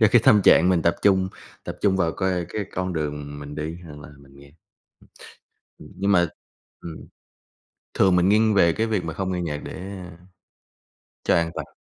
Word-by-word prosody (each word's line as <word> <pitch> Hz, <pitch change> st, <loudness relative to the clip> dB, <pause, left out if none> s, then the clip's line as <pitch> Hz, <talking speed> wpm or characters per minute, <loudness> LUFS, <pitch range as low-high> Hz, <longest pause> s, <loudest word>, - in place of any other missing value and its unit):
cho 110 Hz, -, +6 dB
cái 120 Hz, -, +6 dB
tâm 105 Hz, -2 st, +6 dB
trạng 90 Hz, +3 st, +6 dB
mình 90 Hz, -3 st, +2 dB
tập 85 Hz, -, +2 dB
trung 95 Hz, -2 st, +3 dB, 0.4 s
tập -, -, -6 dB
trung 95 Hz, -2 st, +3 dB
vào 85 Hz, -3 st, +1 dB
coi 90 Hz, -3 st, -1 dB
cái 105 Hz, +1 st, -4 dB
con 90 Hz, 0 st, -2 dB
đường 75 Hz, -2 st, -4 dB
mình 75 Hz, 0 st, -8 dB
đi 80 Hz, +2 st, -5 dB
hoặc 75 Hz, -2 st, -11 dB
là -, -, -11 dB
mình 70 Hz, 0 st, -19 dB
nghe. 70 Hz, 0 st, -16 dB, 1.3 s
Ừm, 75 Hz, -, -13 dB
nhưng 100 Hz, +2 st, +1 dB
mà 85 Hz, -2 st, +4 dB, 0.5 s
ừm. 80 Hz, -2 st, -9 dB, 0.9 s
Thường 95 Hz, -2 st, +4 dB
mình 90 Hz, +2 st, +3 dB
nghiêng 110 Hz, +1 st, +3 dB
về 85 Hz, -4 st, +4 dB
cái 110 Hz, +7 st, -1 dB
việc 105 Hz, -6 st, -1 dB
mà 80 Hz, -, -4 dB
không 95 Hz, -1 st, -3 dB
nghe 90 Hz, -, -2 dB
nhạc 75 Hz, -3 st, -3 dB
để, -, -, -7 dB
a 90 Hz, -3 st, -9 dB, 1.1 s
cho -, -, +3 dB
an 85 Hz, -1 st, +1 dB
toàn. -, -, -7 dB
90 Hz, 195 wpm, -23 LUFS, 80-95 Hz, 1.3 s, cho